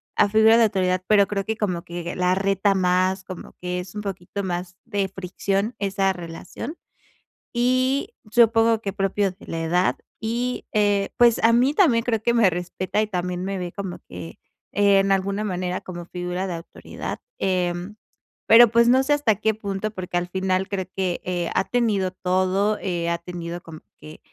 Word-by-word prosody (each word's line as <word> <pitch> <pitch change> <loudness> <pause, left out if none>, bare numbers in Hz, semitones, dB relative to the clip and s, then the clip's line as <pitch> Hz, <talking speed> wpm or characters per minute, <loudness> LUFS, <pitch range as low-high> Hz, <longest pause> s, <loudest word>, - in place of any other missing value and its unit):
a 205 - +4
figura 220 +2 +6
de 230 - +6
autoridad, 185 -3 +1
pero, 205 -2 +5
creo 195 -1 -2
que 220 +1 -2
como 180 -6 -1
que 175 -1 -6
la 180 0 +2
reta 195 +1 +1
más. 185 +1 +1
Como 185 -2 -9
que 180 0 -3
es 185 +2 -8
un 210 - -3
poquito 195 0 -5
más 180 -1 -4
de 205 -4 -1
fricción 195 +3 -2
esa 195 -1 +1
relación, 175 - -8 0.8
y 255 +3 +1 0.2
supongo 225 -1 +4
que 200 - -3
propio 195 0 0
de 180 - -16
la 165 - -4
edad, 180 +3 +1 0.2
y, 240 +3 -2
eh, 205 -2 +2
pues, 240 -3 +4
a 230 - +6
mí 250 +4 +3
también 280 - +4
creo 225 -3 0
que 235 - +2
me 230 -5 +5
respeta, 180 +3 -2
y 215 - 0
también 180 -2 -3
me 195 0 -3
ve 180 -1 -4
como 195 -3 -5
que, 85 -2 -9 0.3
eh, 200 -1 +4
en 195 0 +1
alguna 195 +2 0
manera 180 -2 -2
como 175 -2 -8
figura 180 +1 -4
de 180 - -3
autoridad. 165 - -7 0.2
Eh, 180 -2 0 0.7
pero, 230 +1 +8
pues, 235 0 +5
no 260 +2 +5
sé 290 +2 +2
hasta 285 -7 +2
qué 220 +2 +1
punto, 205 0 -4
porque 185 -3 -4
al 175 0 -1
final 190 +1 -1
creo 190 -2 -2
que, 185 -2 -1
eh, 175 -2 -2
ha - - +1
tenido 210 -6 +1
todo. 185 +3 +1
Eh, 170 -2 -2
ha 170 - 0
tenido 170 0 -6
como 160 -2 -11 0.2
que, 155 0 -12
195 Hz, 185 wpm, -23 LUFS, 180-215 Hz, 0.8 s, pero